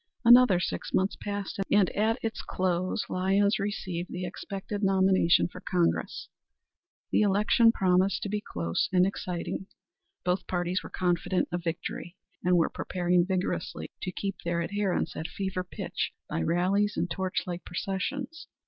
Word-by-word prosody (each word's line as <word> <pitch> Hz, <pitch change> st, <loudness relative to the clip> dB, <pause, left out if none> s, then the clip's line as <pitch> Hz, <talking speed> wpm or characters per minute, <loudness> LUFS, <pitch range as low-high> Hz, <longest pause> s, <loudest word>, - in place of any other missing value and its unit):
Another 240 Hz, -6 st, +8 dB
six -, -, -3 dB
months 190 Hz, +1 st, +1 dB
passed, 205 Hz, -1 st, -4 dB
and 200 Hz, -3 st, +4 dB
at 220 Hz, +3 st, +1 dB
its 225 Hz, -1 st, -2 dB
close 185 Hz, +2 st, -1 dB
Lyons 195 Hz, +3 st, +2 dB
received 185 Hz, -4 st, -3 dB
the 180 Hz, 0 st, -4 dB
expected 195 Hz, +3 st, -5 dB
nomination 190 Hz, -4 st, +4 dB
for -, -, -11 dB
Congress. 175 Hz, -2 st, 0 dB, 0.8 s
The -, -, +3 dB
election 210 Hz, +3 st, +4 dB
promised 185 Hz, -2 st, +2 dB
to 200 Hz, -, -3 dB
be 210 Hz, +1 st, -1 dB
close 85 Hz, -, -1 dB
and 180 Hz, 0 st, +5 dB
exciting. 190 Hz, -1 st, -3 dB, 0.6 s
Both 180 Hz, +1 st, 0 dB
parties 180 Hz, 0 st, -1 dB
were -, -, -9 dB
confident 180 Hz, +1 st, 0 dB
of 175 Hz, 0 st, -2 dB
victory, 170 Hz, +1 st, -4 dB, 0.3 s
and 180 Hz, 0 st, +4 dB
were 165 Hz, -, +4 dB
preparing 180 Hz, -1 st, +1 dB
vigorously 190 Hz, -1 st, -2 dB
to 185 Hz, -, -3 dB
keep 195 Hz, +1 st, -4 dB
their 170 Hz, 0 st, 0 dB
adherents 200 Hz, -3 st, -1 dB
at 160 Hz, -, -3 dB
fever 190 Hz, +2 st, -3 dB
pitch 180 Hz, -, -4 dB
by 80 Hz, -, -2 dB
rallies 190 Hz, -, +1 dB
and 175 Hz, -, +1 dB
torch 185 Hz, +2 st, -2 dB
light 175 Hz, -1 st, -5 dB
processions. 260 Hz, -, -4 dB
185 Hz, 150 wpm, -28 LUFS, 175-200 Hz, 0.8 s, Another